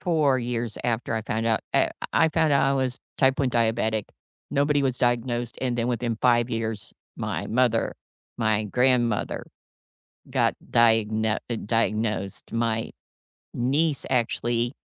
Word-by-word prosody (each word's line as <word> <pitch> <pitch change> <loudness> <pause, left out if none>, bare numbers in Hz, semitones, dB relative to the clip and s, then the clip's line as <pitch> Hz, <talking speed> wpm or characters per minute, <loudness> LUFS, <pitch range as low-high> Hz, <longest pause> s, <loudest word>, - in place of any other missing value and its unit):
4 155 -7 +2
years 120 -2 -3
after 120 -1 -1
I 110 - -2
found 110 +1 -2
out 110 -1 +2
uh, - - +4 0.2
I 160 - +4
found 160 -2 +2
out 140 - +4
I 135 - +2
was 130 -1 -1 0.2
type 135 -1 +3
1 135 -3 +1
diabetic. 110 -2 +1 0.5
Nobody 145 0 +2
was 130 -2 0
diagnosed, 120 -1 0
and 125 -2 -1
then 115 0 0
within 120 -2 -1
5 120 -1 +3
years, 110 -4 -3 0.2
my - - -3
mother, 120 -1 +1 0.4
my 110 -2 +1
grandmother 120 0 +1 0.9
got - - +2
diagno 110 -2 +3 0.3
diagnosed, 105 -3 -1
my 115 -1 -1 0.6
niece 140 +5 0
actually, 120 0 0
120 Hz, 135 wpm, -25 LUFS, 110-130 Hz, 0.9 s, uh